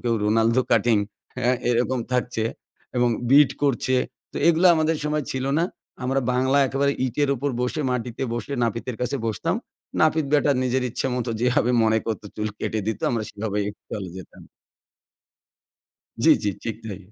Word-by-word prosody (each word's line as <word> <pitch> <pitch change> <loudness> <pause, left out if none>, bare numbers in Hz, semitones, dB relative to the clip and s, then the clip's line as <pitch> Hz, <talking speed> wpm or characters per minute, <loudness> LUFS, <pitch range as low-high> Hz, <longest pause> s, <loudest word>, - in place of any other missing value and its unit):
কেউ 115 -1 +2
Ronaldo 115 +4 +3
cutting. 115 0 +4 0.4
হ্যাঁ? 125 +2 +2
এরকম 125 +2 +1
থাকছে। 125 -3 0 0.5
এবং 125 0 +3 0.2
bit 145 0 +7
করছে। 130 -2 +1 0.4
তো - - -8
এগুলো 170 +2 +5
আমাদের 160 0 +1
সময় 150 -1 0
ছিল 130 0 -2
না। 170 - +3 0.4
আমরা 135 +2 +1
বাংলায় 130 +3 +3
একেবারে 140 +2 +1
ইটের 140 +3 0
উপর 140 +4 -1
বসে 125 +5 -1
মাটিতে 125 -1 -3
বসে 120 +4 -4
নাপিতের 115 +1 -2
কাছে 125 - -1
বসতাম। 110 - -1 0.5
নাপিত 155 0 +3
ব্যাটা 145 0 +4
নিজের 130 0 +1
ইচ্ছে 130 - -2
মত 125 0 -2
যেভাবে 125 -1 +2
মনে 110 0 +3
করতো, 110 -2 -3
চুল 105 0 -1
কেটে 110 - -2
দিত। 110 - -2
আমরা 115 -2 -1
সেভাবেই 105 -1 -2 0.2
চলে 95 -4 -5
যেতাম। 95 - -11 1.8
জ্বি, - - +8
জ্বি। 105 - +1
ঠিক 110 -2 -3
তাই। 100 -4 -6
125 Hz, 160 wpm, -24 LUFS, 110-135 Hz, 1.8 s, জ্বি